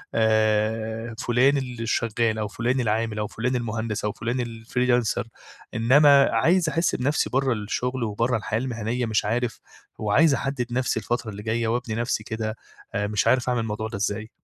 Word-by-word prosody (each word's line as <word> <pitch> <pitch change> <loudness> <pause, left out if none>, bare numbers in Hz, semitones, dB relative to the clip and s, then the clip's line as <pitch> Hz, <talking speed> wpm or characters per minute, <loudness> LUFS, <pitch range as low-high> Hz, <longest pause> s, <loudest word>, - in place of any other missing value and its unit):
آآ، 110 +1 +1
فُلان 130 +5 +3
اللي 125 -4 -4
شغال، 115 -1 0
أو 105 - -1
فُلان 120 +5 -1
العامل 110 -2 0
أو 105 - -1
فُلان 125 +3 -2
المهندس، 110 -3 -2
أو 105 - 0
فُلان 120 +3 -2 0.2
الfreelancer 125 -1 +1 0.5
إنّما 140 +4 +6
عايز 165 +9 +3
أحس 165 +2 +1
بنفسي 140 +4 0
برّه 135 -1 +1
الشغل 120 +4 -2
وبرّه 115 +3 0
الحياة 110 +1 -2
المهنيّة 120 -1 -2
مش 110 -2 0
عارف، 115 +1 -1 0.4
وعايز 140 +9 +3
أحدّد 135 -3 -2
نفسي 125 -3 0
الفترة 120 +2 -2
اللي 105 +1 -8
جايّة 115 +1 0
وأبني 115 -1 -1
نفسي 115 -2 -1
كده 110 0 -4 0.4
آآ، 100 0 0
مش 105 -1 0
عارف 125 -1 +3
أعمل 125 -2 +1
الموضوع 110 0 -3
ده 110 - -6
إزاي؟ 105 +2 -2
115 Hz, 165 wpm, -24 LUFS, 110-125 Hz, 0.5 s, إنّما